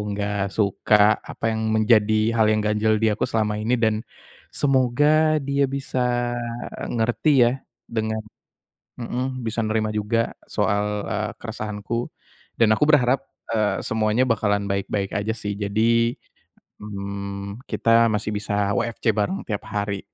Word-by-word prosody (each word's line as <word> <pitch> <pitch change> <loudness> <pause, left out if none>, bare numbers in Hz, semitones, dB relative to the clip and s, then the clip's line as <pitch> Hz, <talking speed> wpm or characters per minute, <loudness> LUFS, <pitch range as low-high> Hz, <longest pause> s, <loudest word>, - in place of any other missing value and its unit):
nggak 100 -1 -1
suka, 105 +1 +3
apa 115 - -3
yang 110 0 -2
menjadi 110 0 +3
hal 110 - +5
yang 110 0 +2
ganjal 105 +1 +2
di 110 - +4
aku 105 - -1
selama 105 -1 0
ini, 115 +4 +1
dan 110 -2 +1 0.6
semoga 145 +3 +3
dia 140 0 +1
bisa 135 -1 -3 0.7
eee, - - -6
ngerti 120 +7 +1
ya, 120 - +4 0.4
dengan 110 -1 -2 0.8
mhm, 125 +1 -3
bisa 115 +1 -2
nerima 110 0 0
juga 105 +2 0 0.2
soal, 105 0 0
eee, - - -2
keresahanku. 105 +2 -4 0.5
Dan 110 -2 +5
aku 150 +7 +2
berharap, 135 -3 +4 0.3
eee, 110 -2 +1
semuanya 110 +3 +1
bakalan 105 -4 +1
baik-baik 100 0 -2
aja 105 +2 -2
sih. 105 -1 -3
Jadi, 115 +4 +1 0.6
mmm, 100 0 -6
kita 115 0 +3
masih 105 0 -1
bisa 105 -1 -1
WFC 115 +2 0
bareng 105 - -1
tiap 105 0 -5
hari. 100 -2 -2
110 Hz, 135 wpm, -23 LUFS, 105-115 Hz, 0.8 s, hal